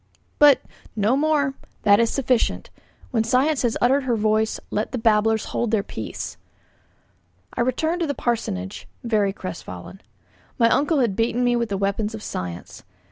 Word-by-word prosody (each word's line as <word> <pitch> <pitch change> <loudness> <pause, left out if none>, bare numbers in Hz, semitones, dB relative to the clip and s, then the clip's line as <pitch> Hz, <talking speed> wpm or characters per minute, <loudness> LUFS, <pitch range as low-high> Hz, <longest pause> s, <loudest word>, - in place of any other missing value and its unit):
"But 290 -3 +7 0.2
" - - -24
'No 215 +4 +2
more; 290 -2 +2 0.3
that 205 -1 +6
is 230 -1 +3
sufficient. 255 -3 0 0.4
When 225 -3 +2
science 260 +6 +2
has 240 -3 0
uttered 265 +3 +3
her 245 -2 +1
voice, 215 0 +1
let 225 +3 -2
babblers 220 -1 +3
hold 235 - 0
their 215 -2 +1
peace.' - - -6 1.2
I - - -1
returned 315 +8 0
to 335 - +1
the 285 - -2
parsonage, 95 - -3 0.2
very 215 -4 +1
crestfallen. 185 - -8 0.6
My 230 -2 +4
uncle 290 +2 +2
had 225 -6 +1
beaten 230 +3 +1
me 245 0 +3
with 235 -2 -1
the 200 - -1
weapons 200 +3 -1
of 215 - -8
science. 90 -1 -6
230 Hz, 160 wpm, -23 LUFS, 210-255 Hz, 1.2 s, But